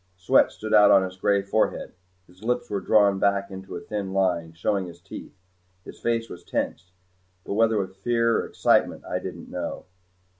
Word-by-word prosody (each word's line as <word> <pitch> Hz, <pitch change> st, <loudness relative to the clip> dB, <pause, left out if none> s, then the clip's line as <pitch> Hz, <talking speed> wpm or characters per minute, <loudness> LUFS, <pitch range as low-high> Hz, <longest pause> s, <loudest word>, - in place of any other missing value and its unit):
Sweat 90 Hz, -, +4 dB
stood 110 Hz, 0 st, -5 dB
out 105 Hz, 0 st, +7 dB
on 95 Hz, -, +6 dB
his 95 Hz, 0 st, -5 dB
gray 100 Hz, +1 st, +1 dB
forehead. 100 Hz, +2 st, -1 dB, 0.3 s
His 90 Hz, +2 st, -22 dB
lips 125 Hz, +2 st, -1 dB
were 100 Hz, -2 st, -1 dB
drawn 100 Hz, -2 st, +4 dB
back 100 Hz, 0 st, +1 dB
into 95 Hz, 0 st, -8 dB
a -, -, -4 dB
thin 100 Hz, -2 st, -5 dB
line, 90 Hz, -4 st, 0 dB
showing 95 Hz, +3 st, -1 dB
his 85 Hz, -1 st, -12 dB
teeth. 85 Hz, -, -10 dB, 0.5 s
His -, -, -11 dB
face 115 Hz, -1 st, -1 dB
was 90 Hz, -, -10 dB
tense, 90 Hz, +3 st, -3 dB, 0.5 s
but -, -, -3 dB
whether 110 Hz, +1 st, +3 dB
with 95 Hz, -1 st, -3 dB
fear 115 Hz, +2 st, +1 dB
or -, -, -3 dB
excitement -, -, +1 dB
I -, -, -2 dB
didn't -, -, -8 dB
know. -, -, -5 dB
100 Hz, 185 wpm, -25 LUFS, 95-110 Hz, 0.5 s, out